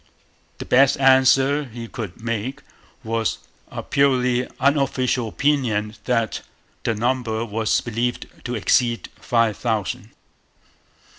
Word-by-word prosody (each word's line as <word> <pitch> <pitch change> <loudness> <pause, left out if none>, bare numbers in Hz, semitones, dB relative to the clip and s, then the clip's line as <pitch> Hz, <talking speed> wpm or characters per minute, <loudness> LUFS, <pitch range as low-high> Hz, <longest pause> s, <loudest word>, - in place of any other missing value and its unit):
The - - -7
best 135 +2 +4
answer 135 +2 +4
he 120 -2 -8
could 110 -3 -7
make 115 +2 -3 0.4
was 115 0 -1 0.3
a - - -6
purely 125 -3 +2
'unofficial 130 -3 +1
opinion' 110 -5 0
that 115 -3 0 0.4
the 115 - -1
number 115 -1 -1
was 110 0 0
believed 120 +1 -2 0.2
to 125 -1 -3
exceed 120 +2 +1
five 115 -3 +1
thousand. 110 -5 -2
120 Hz, 105 wpm, -22 LUFS, 115-130 Hz, 0.4 s, best